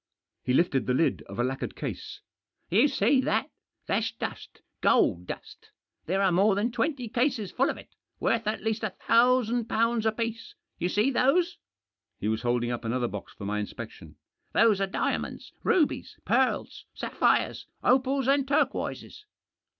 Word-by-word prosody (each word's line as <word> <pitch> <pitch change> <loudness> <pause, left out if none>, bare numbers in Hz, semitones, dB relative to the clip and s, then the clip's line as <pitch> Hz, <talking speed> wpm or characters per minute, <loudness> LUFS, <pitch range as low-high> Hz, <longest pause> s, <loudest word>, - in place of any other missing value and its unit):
He 125 - 0
lifted 140 -6 +2
the 125 - +2
lid 165 - +1
of - - -9
a 120 - +1
lacquered 130 +1 -3
case. - - -6 0.2
" - - -50
You 225 +10 +5
see 275 -1 +3
that? - - 0 0.3
That's 225 0 0
dust— 230 - -7 0.2
gold 90 +1 +3
dust. - - -9 0.4
There 190 +4 +1
are 190 - +4
more 195 +3 +4
than 215 +5 0
twenty 245 +1 -1
cases 235 -4 0
full 265 +2 +2
of - - -3
it, - - -14 0.3
worth 230 -2 0
at 215 - -2
least 220 0 -1
a 215 - +1 0.2
thousand 240 0 +4
pounds 230 0 +1
apiece. 230 +1 -3 0.2
You 175 - 0
see 215 +8 +2
those? 335 +8 +2 0.3
" - - -59
He - - -2
was 110 0 0
holding 120 0 0
up 120 - -4
another 120 +2 0
box 105 -3 -7
for 100 - -8
my 105 +1 -1
inspection. 105 - -8 0.4
"Those 215 -4 +4
are 195 - +1
diamonds, 190 - -3
rubies, 330 -6 +1
pearls, - - 0
sapphires, - - +1 0.2
opals, 265 +1 +2
and 275 0 +3
turquoises. 285 +8 -1
225 Hz, 165 wpm, -28 LUFS, 170-255 Hz, 0.4 s, You